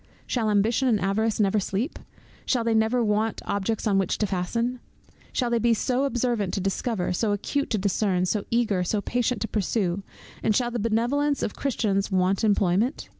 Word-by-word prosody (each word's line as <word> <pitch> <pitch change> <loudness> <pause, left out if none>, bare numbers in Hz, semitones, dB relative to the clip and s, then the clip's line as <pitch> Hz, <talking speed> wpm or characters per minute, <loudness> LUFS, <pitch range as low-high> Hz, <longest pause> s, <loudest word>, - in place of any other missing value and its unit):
Shall 225 -4 0
Ambition 225 +6 +2
and 225 -4 +3
Avarice 210 +4 0
never 210 0 +3
sleep? 200 - -2 0.4
Shall 245 -3 +1
they 230 0 +1
never 220 +2 +2
want 215 0 0
objects 205 +2 -1
on 200 -3 +3
which 190 - 0
to 215 - +1
fasten? 230 +7 -2 0.5
Shall 245 -2 -1
they 235 - +2
be 230 0 +3
so 255 +4 0
observant 240 -6 0
to - - -1
discover, 195 0 -1
so 205 +3 0
acute 280 +8 -2
to 220 - +1
discern, 190 -2 +1
so 200 +2 0
eager, 220 -6 +1
so 205 +4 0
patient 245 +1 -1
to 225 - -1
pursue, 200 -3 -1 0.4
and 215 - +1
shall 240 0 +1
the 240 - -2
Benevolence 240 +7 +1
of - - -2
Christians 210 -7 -1
want 185 +2 +1
employment? 205 - +1
220 Hz, 180 wpm, -25 LUFS, 195-240 Hz, 0.5 s, and